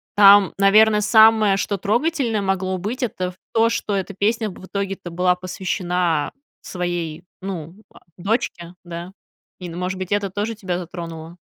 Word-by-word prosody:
там, 200 -1 +7
наверно, 210 +2 +5
самое, 220 -2 +5
что 200 0 -1
трогательное 235 -1 0
могло 190 -1 -1
быть, 220 +9 -4
это 185 -6 -2
в 180 - -22 0.2
то, 225 0 +4
что 215 -3 -2
эта 195 +1 -3
песня 215 +2 0
в - - -13
итоге-то 195 -2 -4
была 180 +2 +2
посвящена 180 -3 -1 0.3
своей, 175 -2 -4 0.2
ну, 175 -4 -6 0.2
а, - - -18 0.2
дочке, 180 -3 -2
да, 175 +1 -7 0.5
и, 180 - -6
ну, 170 - -8
может 185 +1 -3
быть, 185 0 -6
это 205 -1 +1
тоже 205 +4 -3
тебя 185 -5 -3
затронуло. 170 -1 -8
190 Hz, 155 wpm, -21 LUFS, 180-210 Hz, 0.5 s, там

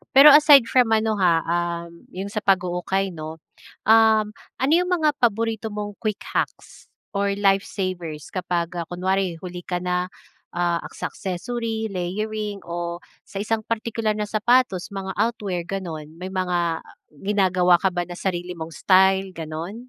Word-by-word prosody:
pero 280 +3 +10
aside 290 -2 +8
from 245 -3 +4
ano, 220 0 +1
ha, 170 -3 +3
um, 170 0 -3
yung 195 +2 -5
sa 215 - -2
pag-uukay 190 0 0
'no. 155 -1 -7 0.5
Um, 220 -1 +5 0.2
ano 265 +3 0
yung 355 +2 +4
mga 320 -4 +2
paborito 225 -1 0
mong 205 -1 -5
quick 215 -2 -2
hacks - - -4 0.2
or 200 0 0
life 195 -1 +2
savers 175 -6 -4
kapag, 180 -2 -2
ah, 170 - -4
kunwari 185 0 -1
huli 180 -1 -6
ka 180 -1 -2
na, 180 0 0 0.5
ah, 175 -1 +1 0.2
sa - - -4
accessory, 220 +3 -3
layering 205 +2 -3
o 170 0 -5 0.2
sa 200 +1 -4
isang 225 0 0
partikular 225 -1 -1
na 210 - -2
sapatos 215 -3 +2
mga 190 -1 -4
outwear 200 -7 -1
gano'n, 170 -6 -5
may 185 +2 -7
mga 175 -3 0 0.4
ginagawa 185 -3 +3
ka 190 - +2
ba 175 -1 -2
na 175 - -7
sarili 180 -1 -3
mong 165 0 -7
style, 190 +1 +3
gano'n? 160 +4 -5
190 Hz, 150 wpm, -23 LUFS, 175-215 Hz, 0.5 s, pero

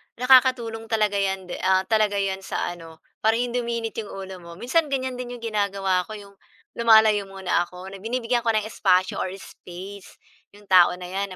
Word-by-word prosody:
nakakatulong 250 -3 +3
talaga 215 -3 +1
'yan 195 -1 -1
de 180 -1 -7
ah, 190 0 +2
talaga 215 0 +1
'yan 195 -1 -1
sa 190 - -3
ano 165 -2 -12 0.2
para 220 +1 +2
hindi 245 +1 -1
uminit 235 -1 -3
'yong 215 - -5
ulo 190 -1 -8
mo. 170 -1 -12
Minsan 265 - 0
ganyan 260 -2 -3
din 245 0 -6
'yong 235 - -13
ginagawa 200 -4 0
ko 215 - -7
'yong 200 -1 -12 0.4
lumalayo 220 -3 +5
muna 190 -2 -1
ako, 180 +1 -11
na 195 - -9
binibigyan 240 +3 -1
ko - - +5
ng 215 - +1
espasyo 185 -4 +1
or - - -1
space 190 +1 -11 0.4
'yong 205 - -17
tao 180 -1 +6
na 180 0 -9
'yan 195 0 -3
205 Hz, 190 wpm, -24 LUFS, 190-230 Hz, 0.4 s, tao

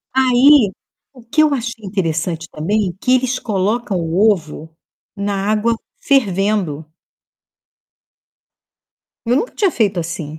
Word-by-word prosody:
Aí, 260 -2 +5 0.4
o 255 - -15
que 295 +7 +1
eu 300 -2 +2
achei 230 -4 -4
interessante 165 -3 -2
também, 185 +3 -1
que 255 - +2
eles 255 0 0
colocam 210 +1 -1
o 175 +6 +2
ovo 160 -3 -5 0.5
na 200 0 -2
água 220 +2 +1 0.2
fervendo. 195 - 0 2.4
Eu 240 - +2
nunca 450 - -1
tinha 395 -5 +2
feito 205 -7 0
assim. 160 -2 -5
205 Hz, 115 wpm, -18 LUFS, 175-245 Hz, 2.4 s, Aí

